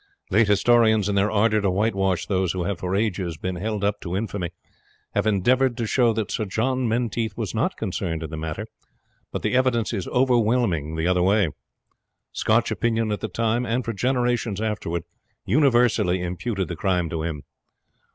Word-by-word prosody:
Late 115 -1 +4
historians, 110 0 +4
in 100 - 0
their 100 +1 +2
ardour 110 0 +2
to 100 - +1
whitewash 95 -2 0
those 95 -3 0
who 90 -1 -2
have 95 0 -2
for 90 +1 -2
ages 95 -6 -1
been 90 +2 -4
held 105 +2 -3
up 100 0 0
to 90 +1 -3
infamy, 100 -4 -3 0.6
have - - +1
endeavoured 120 +5 +2
to 115 - -1
show 120 +1 +3
that 110 -2 -2
Sir 110 - -1
John 125 +6 0
Menteith 115 -1 -1
was - - -3
not - - -1
concerned 80 -1 -3
in 80 - -6
the - - -4
matter; 80 +6 -4 0.7
but - - -4
the - - 0
evidence 125 -3 +2
is 95 -5 -3
overwhelming 115 - +1
the 80 +1 -1
other 90 -1 +2
way. 100 -1 +3 0.8
Scotch - - +1
opinion 115 -2 0
at 105 - -1
the - - -3
time, 115 +5 0
and 120 +1 -1
for 115 - -2
generations 120 -2 0
afterwards, 105 -6 -2 0.4
universally 120 - +3
imputed 95 +2 -3
the 85 - -4
crime 90 0 0
to 80 - -2
him. 80 -3 -4
105 Hz, 180 wpm, -24 LUFS, 90-115 Hz, 0.8 s, Late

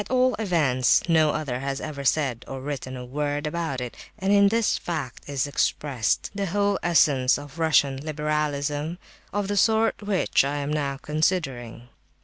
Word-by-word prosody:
At - - -15
all 255 0 +3
events, 150 - +2
no 160 -2 +4
other 145 -5 -2
has 135 +1 -3
ever 145 -3 -6
said 135 -4 +1
or 135 - -6
written 130 -1 -5
a 125 - -7
word 145 +3 -2
about 150 -4 -2
it; 125 -1 -5 0.2
and 195 -1 +1
in 200 0 +6
this 225 +1 +2
fact 145 -7 -5
is 140 -3 0
expressed 140 -4 0
the 200 -1 -2
whole 200 +2 +1
essence 140 -7 +3
of 145 +2 -10
Russian 145 -4 +3
liberalism 150 +1 -2 0.3
of 205 -1 -1
the 205 0 -1
sort 220 +2 +3
which 205 -8 +2
I 140 +1 -2
am 145 +1 -2
now 140 -2 -1
considering. 135 -7 -2
150 Hz, 165 wpm, -25 LUFS, 135-175 Hz, 0.3 s, in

